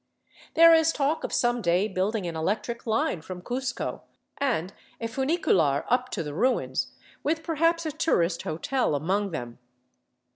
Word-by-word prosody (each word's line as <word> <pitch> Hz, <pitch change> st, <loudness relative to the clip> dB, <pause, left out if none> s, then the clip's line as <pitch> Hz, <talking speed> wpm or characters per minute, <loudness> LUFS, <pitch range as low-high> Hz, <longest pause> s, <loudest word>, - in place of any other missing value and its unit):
There 330 Hz, 0 st, +8 dB
is 325 Hz, 0 st, +5 dB
talk 290 Hz, +1 st, 0 dB
of -, -, -3 dB
some 240 Hz, 0 st, +1 dB
day 180 Hz, +2 st, +2 dB
building 195 Hz, +1 st, -1 dB
an 170 Hz, -1 st, -4 dB
electric 215 Hz, +9 st, -2 dB
line 225 Hz, -, 0 dB
from 180 Hz, +2 st, -8 dB
Cuzco, 250 Hz, +3 st, -3 dB, 0.4 s
and 200 Hz, -, 0 dB, 0.3 s
a 230 Hz, -, -4 dB
funicular 225 Hz, -, +1 dB
up 250 Hz, +1 st, +1 dB
to 175 Hz, -, -3 dB
the 150 Hz, -1 st, -6 dB
ruins, 250 Hz, -, 0 dB, 0.3 s
with 320 Hz, +2 st, -1 dB
perhaps 330 Hz, +1 st, +1 dB
a 310 Hz, -, -1 dB
tourist 170 Hz, -, +1 dB
hotel 170 Hz, -, -1 dB
among 195 Hz, +8 st, 0 dB
them. 120 Hz, -8 st, -6 dB
225 Hz, 150 wpm, -27 LUFS, 170-280 Hz, 0.4 s, There